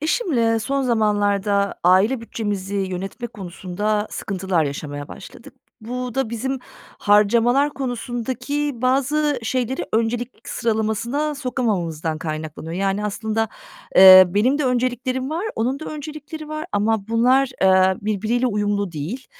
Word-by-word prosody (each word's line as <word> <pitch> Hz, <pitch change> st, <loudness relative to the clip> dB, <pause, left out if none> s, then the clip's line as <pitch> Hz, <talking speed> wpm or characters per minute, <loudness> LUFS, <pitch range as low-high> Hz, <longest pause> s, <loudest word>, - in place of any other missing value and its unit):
Eşimle 265 Hz, -, +1 dB
son 275 Hz, +5 st, -1 dB
zamanlarda 205 Hz, -4 st, +1 dB
aile 195 Hz, +8 st, +4 dB
bütçemizi 205 Hz, -4 st, -4 dB
yönetme 195 Hz, +4 st, -4 dB
konusunda 210 Hz, 0 st, -3 dB
sıkıntılar 190 Hz, -5 st, -1 dB
yaşamaya 145 Hz, 0 st, -5 dB
başladık. -, -, -12 dB, 0.3 s
Bu 250 Hz, +1 st, -5 dB
da 265 Hz, -4 st, -1 dB
bizim 265 Hz, +4 st, -2 dB, 0.4 s
harcamalar 235 Hz, +7 st, +3 dB
konusundaki 255 Hz, +2 st, -3 dB
bazı 280 Hz, +3 st, +1 dB
şeyleri 250 Hz, +2 st, -2 dB
öncelik 230 Hz, +2 st, -2 dB
sıralamasına 235 Hz, +6 st, -1 dB
sokamamamızdan 180 Hz, -, -2 dB
kaynaklanıyor. 155 Hz, 0 st, -5 dB
Yani, 195 Hz, +3 st, -1 dB
aslında, 220 Hz, +2 st, -1 dB, 0.5 s
eee, 185 Hz, 0 st, +11 dB
benim 220 Hz, +10 st, +2 dB
de 300 Hz, -, 0 dB
önceliklerim 255 Hz, +1 st, -1 dB
var, 335 Hz, +6 st, -2 dB
onun 250 Hz, +5 st, 0 dB
da -, -, -6 dB
öncelikleri 305 Hz, +1 st, -7 dB
var 310 Hz, +1 st, -5 dB
ama 210 Hz, 0 st, 0 dB
bunlar, 250 Hz, +4 st, +3 dB
eee, 190 Hz, 0 st, +5 dB
birbiriyle 215 Hz, +4 st, 0 dB
uyumlu 205 Hz, -4 st, -1 dB
değil. 170 Hz, -, -5 dB
225 Hz, 120 wpm, -21 LUFS, 200-260 Hz, 0.5 s, eee